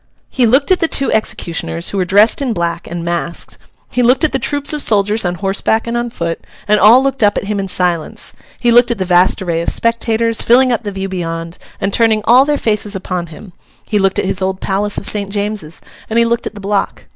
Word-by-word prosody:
He 250 -3 +2
looked 270 +8 +2
at 370 - +4
the 330 - +2
two 275 -3 +1
executioners, 170 -5 -2
who 200 - -4
were 185 - +1
dressed 205 - +3
in 255 -4 -1
black 170 -3 -3
and 170 0 -5
masked; 170 0 -4 0.3
he 250 - 0
looked 250 +5 +3
at 315 - +2
the 270 - -1
troops 285 +1 -2
of 300 - -1
soldiers 210 -1 +2
on 175 0 -1
horseback 200 +4 -1
and 235 0 -3
on 240 0 -2
foot, 170 -7 -4 0.3
and 210 0 +3
all 230 +6 +6
looked 270 -1 -1
up 205 -1 +3
at - - -2
him 205 0 -3
in 195 - -3
silence; 175 -3 -2 0.2
he 240 - +1
looked 240 +1 +5
at 235 - -1
the 190 - -2
vast 180 +1 +2
array 170 -2 -1
of - - 0
spectators, 230 -1 +1
filling 255 +2 +4
up 240 - 0
the 205 -3 -5
view 195 0 -4
beyond, 165 -2 -5 0.2
and 195 - -2
turning 220 -2 +2
all 250 +3 +6
their 295 0 0
faces 210 -3 -1
upon 180 -2 -4
him; 175 +4 -13 0.3
he 210 - 0
looked 195 -1 +1
at - - 0
his 190 0 -1
old 190 0 -2
Palace 200 +1 -2
of - - -4
St. 200 -2 0
James's; 200 -5 -4 0.3
and 225 - -1
he 235 - +4
looked 235 0 -1
at - - -8
the 205 - -9
block. 200 0 -2
205 Hz, 240 wpm, -15 LUFS, 185-235 Hz, 0.3 s, all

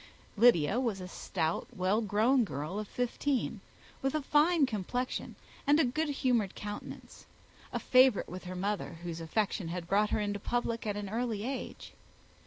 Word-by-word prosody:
Lydia 215 -3 +5
was 230 -7 -1
a 180 - -6
stout, 165 -3 -2
well 190 +4 +1
grown 225 +5 +3
girl 155 +2 -4
of 215 - -5
fifteen, 250 +3 -1 0.4
with 270 +2 0
a 305 - 0
fine 300 +2 +4
complexion 245 +2 -3 0.3
and 285 -4 +4
good 315 +1 0
humoured 245 -8 +1
countenance; 205 0 -8 0.4
a - - -1
favourite 255 -3 +4
with 185 +1 -8
her 185 +1 -5
mother, 200 +2 -2
whose 170 -1 -5
affection 195 +2 -1
had 170 0 -4
brought 205 +3 +3
her - - +1
into 205 -1 -1
public 230 +1 -2
at 205 -1 -1
an 205 -1 -4
early 220 0 -2
age. 265 0 -5
215 Hz, 160 wpm, -31 LUFS, 190-250 Hz, 0.4 s, Lydia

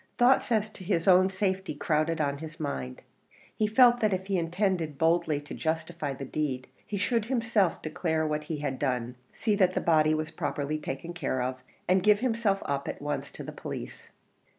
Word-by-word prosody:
Thoughts 245 +1 +4
as 215 -1 +1
to 185 - -11
his 165 -1 0
own 185 0 +6
safety 190 -3 -1
crowded 155 +2 0
on 140 -2 0
his 155 0 -8
mind; 65 -2 -4 0.5
he 215 - +1
felt 240 +2 +6
that 215 -3 +2
if 190 0 -2
he 195 0 -1
intended 170 -3 -1
boldly 160 -2 +2
to 145 - -9
justify 160 -2 -2
the 135 0 -6
deed, 130 -2 -2 0.2
he 205 - -3
should 215 +2 +1
himself 225 -7 +1
declare 160 0 -1
what 150 0 -2
he 155 0 -3
had 145 -3 -3
done 125 -3 -1 0.2
see 220 - 0
that 185 -2 +3
the - - +2
body 155 -2 +3
was 155 +1 -3
properly 150 -2 -2
taken 150 +4 -5
care 130 -7 -1
of 130 0 -3 0.3
and 185 +1 +4
give 210 +2 +4
himself 225 -5 +1
up 140 -1 -2
at - - -4
once 145 0 -3
to - - -9
the - - -6
police. - - -7
165 Hz, 195 wpm, -28 LUFS, 150-195 Hz, 0.5 s, own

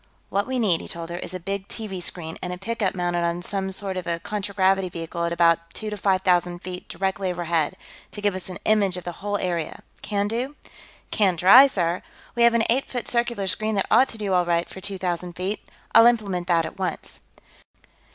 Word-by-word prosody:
"What 200 +1 0
we 260 0 -1
need," 195 -9 +2
he - - -9
told 170 0 -6
her, 175 - -4
"is 185 - -6
a - - -4
big 195 +2 -4
TV 200 -5 -5
screen, 165 -2 -4
and 180 - -4
a 180 - -4
pickup 205 0 -2
mounted 175 -1 0
on 170 +1 -1
some 190 0 -2
sort 190 -1 0
of 180 - -5
a 170 0 -1
contragravity 195 -1 0
vehicle 170 0 -4
at 170 - -1
about 170 -1 +2
two 215 -1 -4
to - - -2
five 190 -2 +1
thousand 175 -1 +1
feet 180 0 -7
directly 190 0 -1
overhead, 170 -3 0 0.3
to - - -8
give 205 -1 +1
us 185 0 -6
an 180 - -6
image 200 -4 +3
of 180 - -6
the 175 - -4
whole 205 0 -1
area. 170 -5 -3 0.2
Can 205 -1 -1
do?" 245 +6 -3 0.6
"Can 190 -5 +2
try, 200 - +9
sir. 175 -8 -1 0.3
We 240 - -1
have 235 0 +6
an 230 - +3
eight 260 +4 +2
foot 245 -3 -4
circular 235 -4 0
screen 215 +3 0
that 195 - +1
ought 265 - +6
to 225 - -6
do 205 -3 -1
all 180 -1 +4
right 170 0 0
for 190 - -10
two 200 0 -3
thousand 180 -1 -3
feet. 185 +4 -3 0.3
I'll 230 - +9
implement 200 -7 +1
that 170 -2 +3
at 195 - -8
once." 185 - -4
190 Hz, 220 wpm, -24 LUFS, 175-205 Hz, 0.6 s, try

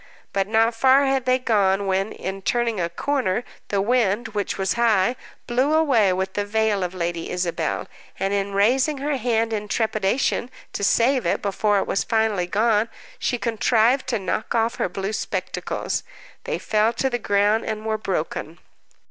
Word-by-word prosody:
But 195 -1 0
not 225 +2 +3
far 265 +4 +4
had 270 -1 +1
they 255 0 +3
gone 200 -5 +1
when, 195 +2 0
in 190 +1 -5
turning 230 0 0
a 170 -1 0
corner, 245 +1 -1 0.2
the 200 -1 0
wind, 235 -1 +1
which 205 -2 -3
was 190 -1 0
high, 235 -1 +2 0.3
blew 260 +6 +1
away 255 -11 +4
with 190 +1 -2
the 205 - -1
veil 210 -1 0
of 180 +1 -4
Lady 170 -1 -3
Isabel, 180 -2 -2 0.3
and, 195 +1 0
in 200 0 -1
raising 260 +8 +3
her 285 +1 -1
hand 230 -2 0
in 210 -1 -3
trepidation 220 +3 0 0.2
to - - -3
save 245 +5 +3
it - - 0
before 205 +1 +1
it 195 - +1
was 195 - 0
finally 220 -5 +1
gone, 215 +3 +2 0.3
she 245 - 0
contrived 235 +2 +2
to 245 -3 0
knock 200 +4 -3
off 230 +1 +1
her - - 0
blue 195 +3 -4
spectacles. - - -3 0.4
They - - -1
fell 215 +2 +1
to 265 - 0
the 245 -2 -1
ground, 205 +1 +2
and 215 0 -4
were 220 -1 -1
broken. 165 -3 -3
220 Hz, 175 wpm, -23 LUFS, 195-240 Hz, 0.4 s, far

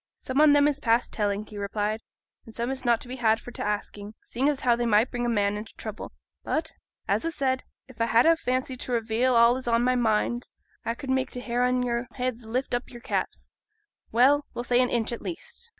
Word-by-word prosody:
'Some 260 +3 -1
on 300 -1 +7
'em 290 0 +5
is 295 -1 0
past 230 -2 +1
telling,' 205 -1 -1
he 210 -1 -9
replied, 210 +2 -2 0.5
'an 225 - -11
some 235 +3 -2
is 265 -1 -5
not 240 -2 +3
to - - -8
be 255 +1 -6
had 225 -2 +3
for 245 - -10
t' - - -7
asking, 210 0 -4
seeing 265 +5 0
as 290 -2 -1
how 245 -2 +4
they 240 0 -1
might 220 +3 +3
bring 240 0 -2
a - - +1
man 205 -3 +1
into 210 +2 -8
trouble. 215 -1 -7 0.3
But, 320 +1 -2 0.4
as - - +1
a 330 - -1
said, 260 -4 -1 0.2
if 260 -3 -16
a 230 - +2
had 230 +1 +4
a 330 0 +6
fancy 255 -3 -2
to 255 - -6
reveal 235 +2 +1
all 235 +1 +6
as 260 - -7
is - - -3
on 235 0 +3
my 255 +1 +3
mind 240 +1 0 0.3
a 230 - -2
could 265 +1 -5
make 260 0 +1
t' 250 - -6
hair 245 0 -2
on 250 0 +2
your 240 0 -1
heads 250 -2 -3
lift 250 +4 -2
up 245 +1 -2
your 240 -1 -11
caps - - -3 0.6
well, 280 +5 +4
we'll 240 - -3
say 245 0 +3
an 250 - +2
inch, 235 -1 0
at 235 - -5
least. 475 +6 -7
240 Hz, 245 wpm, -26 LUFS, 225-260 Hz, 0.6 s, on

